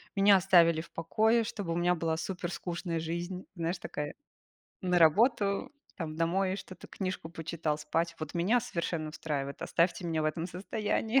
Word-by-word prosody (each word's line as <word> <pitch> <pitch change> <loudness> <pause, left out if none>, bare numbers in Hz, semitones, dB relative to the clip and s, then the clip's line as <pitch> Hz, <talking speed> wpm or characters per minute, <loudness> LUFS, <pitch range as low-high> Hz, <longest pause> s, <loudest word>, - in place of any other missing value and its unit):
меня 200 0 +7
оставили 175 -4 +5
в 170 - -14
покое, 220 +7 +2
чтобы 205 -6 -4
у - - -1
меня 175 +1 +3
была 160 -1 -1
супер 175 0 -4
скучная 170 -2 -3
жизнь, 175 +3 -4
знаешь, 170 +1 -1
такая 150 0 -4 0.7
на 180 -1 +2
работу, 200 - +4 0.3
там, 160 -3 -4
домой 185 +4 +1
что-то, 185 -2 -9
книжку 185 -4 -4
почитал, 165 -2 -2
спать. 165 +3 -1
Вот 155 -2 -5
меня 190 +8 +3
совершенно 170 -8 -3
устраивает, 145 -3 -4
оставьте 170 +1 +1
меня 160 -2 0
в - - +1
этом 160 +2 -1
состоянии. 215 +6 0
170 Hz, 160 wpm, -31 LUFS, 165-190 Hz, 0.7 s, меня